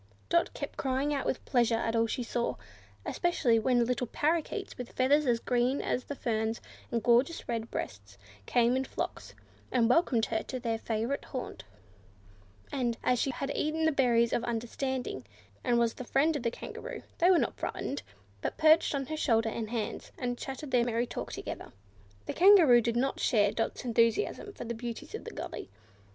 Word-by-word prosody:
Dot 340 0 +3
kept - - -6
crying 270 +2 0
out 280 - -1
with 260 - -2
pleasure 240 -3 +3
at 225 0 -1
all 230 0 +3
she 245 - -2
saw; 235 - -1 0.5
especially 260 -10 +2
when 240 +1 +3
little 250 0 -1
Parrakeets, 330 - -1
with 250 -2 -8
feathers 285 +3 +3
as 235 -1 +3
green 250 +3 +1
as 250 - -1
the 285 - -5
ferns, 225 -2 -1 0.3
and 230 -1 -1
gorgeous 245 +7 +3
red 230 -1 -2
breasts, 100 0 -6 0.3
came 240 +1 +3
in 265 - +1
flocks, - - -5 0.4
and 240 -2 +3
welcomed 250 -7 +3
her 220 -1 -1
to 255 - -5
their 230 -2 -2
favourite 230 +5 -2
haunt; 255 - -6 1.1
and, 240 -4 -1
as 250 -1 +2
she 275 - +1
had 275 +2 -3
eaten 315 +1 0
the 320 - +4
berries 240 -4 +3
of 240 - +1
understanding, 240 - -3 0.4
and 240 - +2
was 235 -1 +2
the - - -7
friend 295 +6 +2
of 290 - -2
the 235 - +1
Kangaroo, - - -7 0.2
they 350 - +5
were 370 - +6
not - - +1
frightened, 280 - -3 0.4
but - - -3
perched 315 -1 +5
on 275 -1 -1
her 310 - -4
shoulders 225 -6 +2
and 220 -2 -3
hands, 230 -2 -4
and 245 -1 -2
chatted 270 +3 -6
their 245 -2 +4
merry 235 0 0
talk - - -5
all - - -6
together. - - -6 0.5
The - - -3
Kangaroo 340 -10 +7
did 235 0 -1
not 270 +3 0
share 205 -5 +3
Dot's 225 - -3
enthusiasm 235 - +1
for - - -7
the 235 - -4
beauties 235 0 -6
of - - -6
the - - -6
gully. - - -6
245 Hz, 190 wpm, -30 LUFS, 230-275 Hz, 1.1 s, Kangaroo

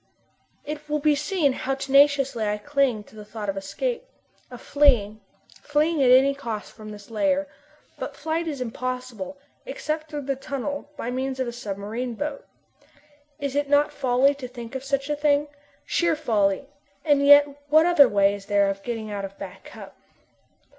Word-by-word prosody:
It 300 0 -7
will 300 - +1
be 300 0 +3
seen 295 0 +1
how 270 +1 -2
tenaciously 275 -2 +3
I 210 0 0
cling 265 -2 0
to 220 - -19
the 210 - -9
thought 210 -1 -6
of 195 - -2
escape 485 - -3 0.5
of 245 -1 -10
fleeing 235 -8 +2 0.4
fleeing 305 +1 +1
at 255 - +4
any 265 +2 +6
cost 230 -6 -6
from 215 -1 -11
this 205 +1 -11
lair. 285 +6 +1 0.5
But - - -5
flight 325 +1 -2
is 285 -5 -4
impossible, 250 -1 -5 0.3
except 310 -10 -4
through 295 -2 -5
the 275 0 -1
tunnel, 280 +2 -5
by 240 - -4
means 260 +1 -3
of 260 - -1
a - - -3
submarine 225 +2 -5
boat. 290 +3 -5 0.9
Is 280 -2 -3
it 290 0 0
not 290 +1 +3
folly 265 +1 +3
to 275 -3 -8
think 240 -1 -9
of 265 0 -5
such 275 0 -1
a 295 - 0
thing? 295 0 +1 0.4
Sheer 340 -2 +1
folly, 220 -6 +1 0.4
and 290 -2 +3
yet 285 0 +8 0.2
what 310 +2 +6
other 300 -7 +6
way 200 0 +3
is 200 0 -9
there 200 -1 +3
of 195 0 -7
getting 225 -1 -5
out 200 -1 -4
of 195 0 -7
Back - - -9
Cup? - - -11
270 Hz, 175 wpm, -24 LUFS, 225-290 Hz, 0.9 s, yet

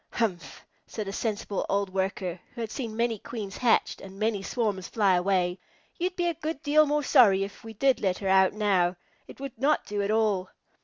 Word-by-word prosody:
"Humph!" 175 - -3 0.2
said 215 -3 -5
a 195 - -4
sensible 205 -2 -2
old 200 -1 0
Worker, 190 -2 -2 0.2
who 235 - -5
had 225 -1 -4
seen 230 -5 -5
many 230 -1 0
Queens 205 -4 -6
hatched 240 -2 +2
and 195 0 -11
many 215 -1 0
swarms 200 -3 -2
fly 205 -4 +2
away, 180 0 +1 0.4
"you'd 360 +1 -1
be 350 - -1
a 340 - +1
good 310 -1 -5
deal 305 +1 +4
more 295 +1 +1
sorry 195 -7 +5
if 200 0 -8
we 225 0 -8
did 265 +2 +2
let 185 -3 +1
her 195 - -4
out 190 0 +4
now. 190 -4 +2 0.3
It - - -13
would 275 -4 -7
not 295 +4 +2
do 205 0 -2
at 200 - -1
all." 210 -4 +1
210 Hz, 205 wpm, -27 LUFS, 190-240 Hz, 0.4 s, sorry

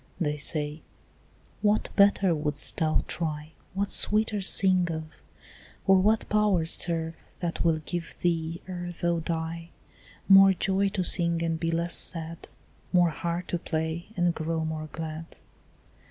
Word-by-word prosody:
They 150 -4 -1
say, 150 +1 -2 0.8
"what 210 0 +1
better 200 -3 +4
wouldst 150 -2 0
thou 155 -1 +1
try, 155 -2 -4 0.2
What 200 +1 -1
sweeter 210 0 +2
sing 185 -2 +3
of? 160 -1 -7 0.6
or 195 0 +5
what 215 +4 +2
powers 200 -6 +2
Serve, 165 -1 +1 0.3
that 170 -1 -3
will 165 -2 +2
give 170 +2 -6
thee 165 -1 -2
ere 175 -1 -5
thou 170 -1 0
die 165 0 -4 0.6
More 195 0 +8
joy 195 +2 +1
to 190 -2 -2
sing 170 -1 +1
and 165 -1 -1
be 165 - -1
less 170 +1 -1
sad, 165 -1 +1 0.4
More 175 -2 +3
heart 170 +4 -4
to 175 - -1
play 160 +1 -3
and 175 -1 +2
grow 160 0 -3
more 155 -1 -5
glad?" 160 0 -7
170 Hz, 140 wpm, -27 LUFS, 160-185 Hz, 0.8 s, More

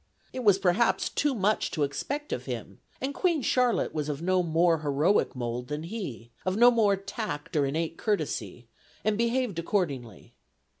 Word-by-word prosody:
It 255 - -4
was 205 -4 +6
perhaps 195 +5 +2
too 290 -2 0
much 210 0 +1
to 155 - -1
expect 280 - -3
of - - -4
him, - - -6 0.2
and 270 +2 -2
Queen 335 -3 +1
Charlotte 250 -1 +2
was 150 -1 -2
of 145 -2 -3
no 185 +2 +2
more 165 0 +2
heroic 150 +4 +1
mold 120 0 -3
than 150 +1 -4
he, 165 - -6
of 185 +1 -1
no 240 +2 +8
more 215 -4 +3
tact 195 -6 -5
or 145 -2 +3
innate 160 +3 -2
courtesy, 210 -2 -2 0.4
and 215 -1 +2
behaved 235 -4 0
accordingly. 145 - -2
185 Hz, 165 wpm, -28 LUFS, 150-230 Hz, 0.4 s, no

